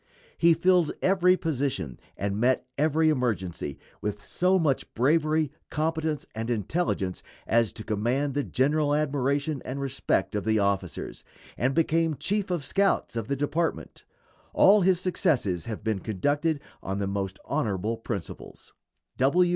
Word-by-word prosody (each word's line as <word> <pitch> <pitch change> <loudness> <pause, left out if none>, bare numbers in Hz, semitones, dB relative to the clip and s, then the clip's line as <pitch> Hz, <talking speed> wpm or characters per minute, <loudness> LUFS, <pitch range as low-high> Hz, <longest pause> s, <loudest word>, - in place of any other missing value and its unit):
He 170 -1 +5
filled 180 -1 +3
every 185 -1 +4
position 135 - -2 0.2
and 100 +1 -2
met 125 +2 +2
every 155 +2 +3
emergency 100 - -2 0.2
with 105 0 -4
so 185 +1 +2
much 150 -7 0
bravery, 155 +3 +2 0.2
competence, 160 -1 -1
and 115 +1 -4
intelligence 110 - -1 0.2
as 115 -1 +2
to 110 - -7
command 120 +7 0
the 145 +1 0
general 145 +3 +1
admiration 140 -1 0
and 130 +2 -5
respect 135 -3 -1
of 105 -2 -1
the 110 0 +2
officers, 100 -1 -2 0.3
and 130 +3 0
became 165 -1 +2
chief 190 +8 -1
of 170 -6 -2
scouts 195 -3 +1
of 115 -2 -3
the 140 - 0
department. 150 +4 -2 0.5
All 205 +1 +6
his 185 -1 +3
successes 140 - 0
have 110 -3 -5
been 110 -3 0
conducted 145 - 0 0.2
on 95 +1 -3
the 100 - -1
most 95 -1 -3
honorable 110 -6 -1
principles. 110 -5 -7
140 Hz, 140 wpm, -27 LUFS, 110-160 Hz, 0.5 s, All